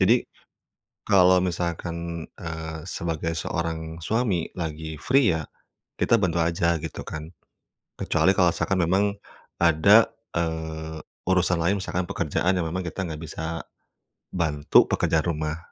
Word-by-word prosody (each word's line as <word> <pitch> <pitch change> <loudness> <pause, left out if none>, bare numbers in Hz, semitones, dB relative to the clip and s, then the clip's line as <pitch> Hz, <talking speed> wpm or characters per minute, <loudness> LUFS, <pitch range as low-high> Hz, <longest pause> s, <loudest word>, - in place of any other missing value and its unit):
Jadi - - +4 0.8
kalau 95 -2 +6
misalkan, 85 -1 -3
eee, 80 -1 -5
sebagai 85 0 -2
seorang 80 -1 -3
suami 105 -6 0
lagi 80 -1 -4
free 130 -3 +4
ya, 80 - -3 0.6
kita 115 - +4
bantu 85 -2 +1
aja 85 0 +1
gitu 80 - -5
kan. 80 +1 -6 0.7
Kecuali - - +3
kalau - - +5
misalkan 95 - 0
memang 95 +4 +3 0.6
ada, 85 +7 +6 0.3
eee, 80 -1 -3 0.3
urusan 90 -1 +3
lain 95 +5 +2
misalkan 90 -1 -2
pekerjaan 95 +2 0
yang 90 - 0
memang 95 +3 -3
kita 95 +2 -4
nggak 80 -1 -6
bisa, 80 +2 -4 0.7
bantu 75 -4 +3
pekerjaan 80 -1 +1
rumah. 80 -2 -2
85 Hz, 125 wpm, -25 LUFS, 80-90 Hz, 0.8 s, kalau